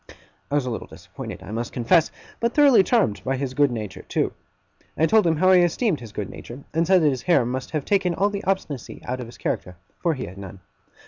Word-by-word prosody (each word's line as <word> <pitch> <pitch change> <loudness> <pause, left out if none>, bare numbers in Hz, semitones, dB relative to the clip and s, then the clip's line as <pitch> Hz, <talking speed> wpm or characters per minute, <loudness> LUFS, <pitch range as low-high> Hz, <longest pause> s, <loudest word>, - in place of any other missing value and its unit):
I 145 - -1
was 145 -3 +1
a 125 - -2
little 115 - -5
disappointed, - - -9
I - - -9
must 115 +2 -4
confess, 155 +7 +3 0.3
but 235 0 0
thoroughly 285 -7 +7
charmed 195 - +1
by 135 0 -1
his 130 -1 -3
good 145 +1 +3
nature 110 -5 -5
too. - - -1 0.6
I 160 - +4
told 215 +1 +4
him 165 - +3
how 185 +4 +4
I 185 - +7
esteemed 175 - +1
his 115 -3 -10
good 105 -2 -4
nature; 125 +7 -10
and 165 +1 +1
said 185 -2 +5
that 150 - +5
his 130 -3 -2
hair 170 -9 +3
must 130 +2 -3
have 155 -3 -3
taken 190 -4 +1
all 200 +3 +1
the 200 0 -4
obstinacy 185 -9 -3
out 125 +1 -3
of 125 - -6
his 120 - -13
character, 90 - -3 0.2
for 170 -3 +1
he 130 - -5
had 95 +2 -10
none. 95 -1 -9
145 Hz, 240 wpm, -23 LUFS, 120-185 Hz, 0.6 s, thoroughly